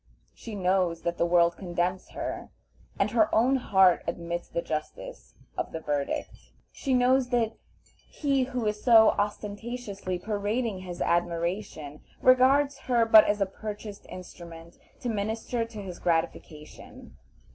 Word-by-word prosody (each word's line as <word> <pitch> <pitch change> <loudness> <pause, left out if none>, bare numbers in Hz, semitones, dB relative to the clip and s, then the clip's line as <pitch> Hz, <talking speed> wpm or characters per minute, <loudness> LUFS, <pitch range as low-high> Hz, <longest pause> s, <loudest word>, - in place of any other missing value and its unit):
She 225 -3 -9
knows 180 -3 0
that 170 0 -2
the 170 - +2
world 170 0 +3
condemns 180 0 -2
her, - - -5 0.5
and - - +1
her 320 - +3
own 255 +5 +4
heart 190 -7 +4
admits 170 0 -4
the 170 - -3
justice 160 - -6 0.2
of - - -3
the 160 - -5
verdict. 145 -3 -2 0.4
She 265 -3 -1
knows 250 +1 +3
that 235 -3 +1 0.6
he 275 -3 0
who 250 -3 -3
is 210 0 -2
so 225 -3 +7
ostentatiously 205 -1 -4
parading 210 +2 -2
his 180 -2 -5
admiration 170 -3 -2 0.2
regards 270 +2 +4
her 235 -2 +4
but 220 -1 +8
as 205 0 0
a - - +4
purchased 205 +1 -8
instrument 170 -2 -11 0.2
to - - -4
minister 225 +2 -2
to 225 -2 -9
his 180 -2 -8
gratification. 160 -2 -4
205 Hz, 135 wpm, -27 LUFS, 175-235 Hz, 0.6 s, but